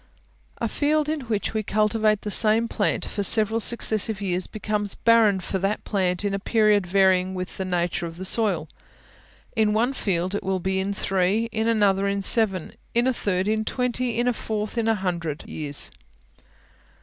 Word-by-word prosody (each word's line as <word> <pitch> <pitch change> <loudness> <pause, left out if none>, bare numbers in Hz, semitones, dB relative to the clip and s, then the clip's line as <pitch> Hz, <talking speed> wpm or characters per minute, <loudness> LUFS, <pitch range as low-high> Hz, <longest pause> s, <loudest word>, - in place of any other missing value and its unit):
A 230 - -1
field 300 +5 0
in 310 0 -1
which 215 -2 -2
we 220 - 0
cultivate 215 0 +1
the 210 - -4
same 220 +2 +4
plant - - -1
for 205 - -4
several 220 +2 +3
successive 220 -2 0
years 185 -2 -2
becomes 210 -1 -3
barren 225 -4 +4
for 190 +1 -3
that 195 +3 -1
plant 185 -2 0
in 200 - 0
a 195 - -1
period 210 -2 +2
varying 190 0 +2
with 185 0 -6
the 190 - -3
nature 175 -1 -1
of 165 0 -10
the 185 - -4
soil: 190 -7 +1 0.9
in 215 -2 +2
one 235 +5 +1
field 185 -6 -1
it 205 - -2
will 190 0 -1
be 190 +1 -1
in 195 +1 -1
three, 195 +3 0
in 220 +1 -1
another 200 -3 +2
in 200 0 -1
seven, 195 -6 +2 0.2
in 240 +1 +3
a 260 - +2
third 190 -4 -1
in 220 0 +1
twenty, 250 0 -2
in 240 +1 +1
a 245 - +2
fourth 215 -1 -4
in 230 -1 0
a 225 - +3
hundred 170 -6 -3
years. 145 -2 -2
205 Hz, 185 wpm, -24 LUFS, 190-225 Hz, 0.9 s, same